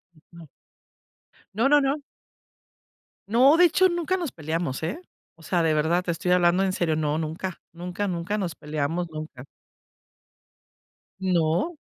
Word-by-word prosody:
Ujú. 165 +1 -16 1.1
No, 230 +6 +2
no, 295 +1 +6
no. 280 +1 0 1.3
No, 260 +8 +5
de 355 - +7
hecho, 370 +3 +4
nunca 345 +1 -1
nos 345 -6 -3
peleamos, 160 -3 -3
eh, 175 - -3 0.3
o 165 - -19
sea, 175 +2 0
de 160 -1 +2
verdad, 160 +4 +2
te 180 - -2
estoy 175 +2 -2
hablando 180 +1 +4
en 190 - +1
serio, 170 -4 0
no, 155 -1 0
nunca, 165 +4 -4
nunca, 180 +4 -4
nunca 180 +3 -2
nos 180 -5 -3
peleamos, 155 +4 -2
nunca. 155 -5 -8 1.8
No. 180 - +1
175 Hz, 140 wpm, -25 LUFS, 160-210 Hz, 1.8 s, de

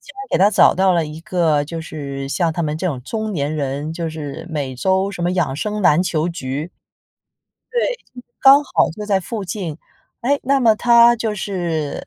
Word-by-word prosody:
竟 - - -14
然 270 - -6
给 - - +3
他 205 - +5
找 - - +5
到 190 0 +3
了 170 -3 +1
一 150 +1 -8
个 165 -4 +1
就 165 +2 -6
是 140 -4 -6
像 165 +3 0
他 170 - -4
们 150 0 -2
这 185 - -2
种 135 -6 -4
中 215 - -4
年 150 -3 -2
人， 145 +1 -3
就 165 0 -4
是 155 0 -7
每 140 -4 -3
周 190 +7 +1
什 175 - -5
么 175 - +1
养 165 -8 0
生 210 +5 -3
篮 175 -2 +4
球 170 -3 -1
局。 155 -1 -5 1.0
对， - - 0 0.4
刚 275 +2 +7
好 - - +1
就 210 +5 -7
在 195 -2 +2
附 205 +4 -5
近。 175 -4 -5 0.4
哎， 275 +4 +1
那 275 +1 +2
么 225 -3 +5
他 235 +1 +6
就 220 -2 -2
是 175 -7 -3
175 Hz, 215 characters per minute, -19 LUFS, 150-210 Hz, 1.0 s, 刚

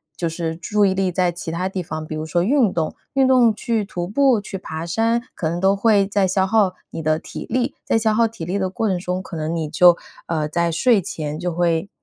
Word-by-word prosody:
就 170 - -2
是 165 -1 -3
注 205 +4 +1
意 190 - +2
力 190 -1 0
在 180 -1 +1
其 165 -1 -6
它 175 +3 -2
地 190 -1 -3
方。 155 0 -5
比 155 - -5
如 155 - -4
说 170 +2 0
运 240 -3 +3
动， 160 -2 -2 0.2
运 270 -1 +3
动 245 -4 +5
去 225 0 -1
徒 175 -3 -5
步、 255 +2 +3
去 195 -1 -6
爬 160 -2 -6
山， 225 +6 +1
可 160 - -2
能 170 +1 -3
都 195 +1 +3
会 200 -1 +3
在 200 -1 +1
消 190 +1 +1
耗 200 -3 +2 0.2
你 - - -5
的 155 0 +1
体 - - -8
力。 250 +3 -1
在 - - +1
消 220 -1 +2
耗 230 +1 +3
体 220 -7 -8
力 185 +4 -2
的 190 -1 0
过 220 +4 -2
程 190 -3 +1
中， 180 +1 -3
可 185 - -9
能 160 +1 -2
你 160 -2 -2
就 175 +3 +5 0.3
呃， 155 -2 -1
在 170 +2 0
睡 220 +4 +3
前 155 -2 -5
就 180 0 -2
会 170 +2 0
185 Hz, 265 characters per minute, -21 LUFS, 165-215 Hz, 0.3 s, 动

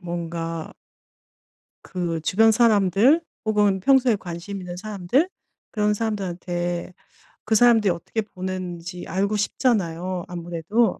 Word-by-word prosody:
뭔가 165 -1 -4 1.1
그 170 -3 -3
주변 225 +7 +4
사람들 220 - +4 0.2
혹은 205 -3 +2
평소에 260 +2 +4
관심 185 +1 -6
있는 180 -1 -7
사람들 210 - 0 0.4
그런 210 -1 +1
사람들한테 180 -5 -3 0.5
그 220 - +1
사람들이 225 -2 +5
어떻게 170 +6 -3
보는지 180 -3 -6
알고 200 +4 0
싶잖아요 185 -5 0
아무래도. 175 +5 -1
190 Hz, 260 characters per minute, -23 LUFS, 175-215 Hz, 1.1 s, 사람들이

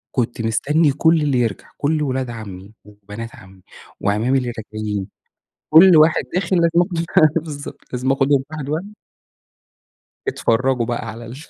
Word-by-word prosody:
كنت 120 -2 -1
مستني 140 +8 +1
كُلّ 160 +3 +2
اللي 140 -4 +1
يرجع، 115 -5 -2
كُلّ 150 +1 0
ولاد 130 -2 -2
عمي 105 -3 -9
وبنات 105 +2 -10
عمي 95 0 -16 0.4
وأعمامي 110 +6 +1
اللي 125 -2 -2
راجعين، 110 -2 -4 0.6
كُلّ 170 +2 +8
واحد 155 +1 +5
داخل 185 0 0
لازم 170 0 +3
أخدُه 175 -2 -2
ف 155 -2 +5
بالضبط، 145 -3 -9
لازم 125 +2 0
أخُدهُم 135 0 +2
واحد 150 -3 -6
واحد. 175 +8 -4 1.3
أتفرَّجُوا 125 +1 0
بقى 120 -1 -3
على 115 +2 -8
ال 120 +3 -9
130 Hz, 145 wpm, -20 LUFS, 115-155 Hz, 1.3 s, كُلّ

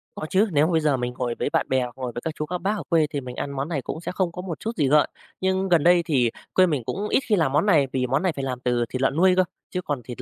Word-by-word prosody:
Có - - -5
chứ, 200 +3 +3
nếu 150 -1 +4
mà - - -1
bây 160 -1 +2
giờ 150 -3 +2
mình 125 0 -3
ngồi 125 -1 -3
với - - 0
bạn - - +1
bè 130 -1 +2
hoặc 125 0 -7
ngồi 130 -2 -4
với 120 - -4
các 160 +2 -4
chú 150 - -3
các 180 +3 -3
bác 205 +4 0
ở - - -5
quê 160 -3 +3
thì 145 - -3
mình 125 -1 -8
ăn 140 - -4
món 140 +2 -3
này 145 -6 -2
cũng 160 - -6
sẽ - - -4
không 185 -2 -1
có 180 - -6
một 180 -4 -6
chút 225 - -3
gì 145 -5 +2
gợn, 150 +2 +4 0.3
nhưng 190 0 0
gần 170 -4 +4
đây 175 0 +5
thì 125 -8 +2 0.2
quê 185 - +5
mình 150 -8 -1
cũng 210 - -3
ít - - +3
khi 210 - +5
làm 160 -8 +1
món 150 +7 +2
này 155 -9 +4
vì 125 -1 0
món 135 +7 0
này 185 - +2
phải 140 -3 -5
làm 125 -2 -3
từ 120 -1 0
thịt 130 - -4
lợn 135 +1 +1
nuôi 185 +2 +5
cơ, 185 - +4 0.3
chứ 180 - -3
còn 145 -7 -3
thịt 120 +1 -8
150 Hz, 340 wpm, -24 LUFS, 130-180 Hz, 0.3 s, đây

